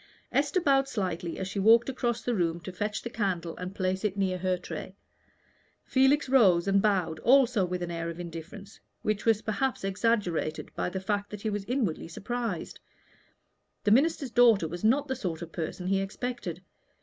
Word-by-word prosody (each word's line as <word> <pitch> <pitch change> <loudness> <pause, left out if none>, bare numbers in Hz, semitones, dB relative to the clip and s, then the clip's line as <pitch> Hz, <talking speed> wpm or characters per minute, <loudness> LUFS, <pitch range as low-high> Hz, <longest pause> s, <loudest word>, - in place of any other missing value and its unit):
Esther 290 +6 +2
bowed 275 -5 +3
slightly 180 -8 -3
as 190 - -3
she 195 +1 -4
walked 225 +4 +6
across 240 -3 -2
the 245 - 0
room 170 -4 0
to 185 - -7
fetch 210 +3 -3
the 235 - -4
candle 180 -7 -2
and 180 +2 -6
place 185 0 -1
it 205 -2 -1
near 185 -2 0
her 185 0 0
tray. 185 +1 -7 0.9
Felix 270 +2 +3
rose 200 -10 +4
and 195 0 +4
bowed, 185 -6 +1
also 250 -5 +4
with 180 0 -3
an 175 - -4
air 170 0 -3
of 170 +1 -7
indifference, 175 +4 -9 0.2
which 215 -1 -1
was 225 -2 +3
perhaps 240 +3 -1
exaggerated 195 -6 -1
by - - -2
the 190 - -4
fact 205 +1 -2
that 210 -1 -8
he 220 - -1
was 205 -1 -3
inwardly 225 - -1
surprised. 215 +2 -4 1.0
The 205 - +2
minister's 275 +1 +3
daughter 235 -8 +5
was 175 +4 -7
not 275 +6 +3
the 265 - -1
sort 180 -9 -4
of 165 - -9
person 170 +2 -5
he 195 +1 +1
expected. 245 +5 -5
200 Hz, 185 wpm, -28 LUFS, 180-235 Hz, 1.0 s, walked